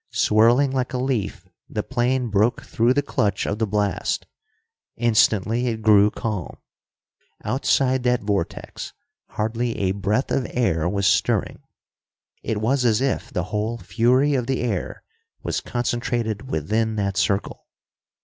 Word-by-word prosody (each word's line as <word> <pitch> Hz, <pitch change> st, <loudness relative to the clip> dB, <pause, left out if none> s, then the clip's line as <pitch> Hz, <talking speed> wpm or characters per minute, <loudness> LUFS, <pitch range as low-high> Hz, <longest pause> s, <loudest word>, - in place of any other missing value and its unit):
Swirling 120 Hz, +6 st, +4 dB
like 130 Hz, -1 st, -2 dB
a -, -, 0 dB
leaf, 125 Hz, -5 st, -2 dB, 0.2 s
the -, -, -3 dB
plane 125 Hz, 0 st, 0 dB
broke 105 Hz, +4 st, +1 dB
through 115 Hz, +2 st, +1 dB
the 145 Hz, +2 st, +2 dB
clutch 100 Hz, -7 st, 0 dB
of 105 Hz, -, -2 dB
the 110 Hz, -, +1 dB
blast. 105 Hz, 0 st, -1 dB, 0.7 s
Instantly 115 Hz, 0 st, +2 dB
it 110 Hz, -2 st, -3 dB
grew 105 Hz, -1 st, +6 dB
calm. 105 Hz, -5 st, -4 dB, 0.9 s
Outside 130 Hz, 0 st, +1 dB
that 125 Hz, -2 st, +1 dB
vortex, 100 Hz, -4 st, -3 dB, 0.3 s
hardly 115 Hz, +2 st, -2 dB
a 95 Hz, -2 st, +1 dB
breath 100 Hz, +6 st, -1 dB
of 130 Hz, -, 0 dB
air 85 Hz, -9 st, 0 dB
was 100 Hz, 0 st, -1 dB
stirring. 95 Hz, -, +1 dB, 0.8 s
It 110 Hz, -, -2 dB
was 125 Hz, +5 st, +1 dB
as 115 Hz, -2 st, +3 dB
if 135 Hz, 0 st, -1 dB
the 90 Hz, -, -1 dB
whole 110 Hz, +3 st, -1 dB
fury 125 Hz, +6 st, +2 dB
of 125 Hz, -3 st, 0 dB
the 135 Hz, -1 st, -1 dB
air 110 Hz, -7 st, -3 dB, 0.4 s
was -, -, -2 dB
concentrated 120 Hz, -1 st, -2 dB
within 110 Hz, -, -1 dB
that 100 Hz, -2 st, -1 dB
circle. 100 Hz, 0 st, -1 dB
115 Hz, 140 wpm, -23 LUFS, 105-125 Hz, 0.9 s, grew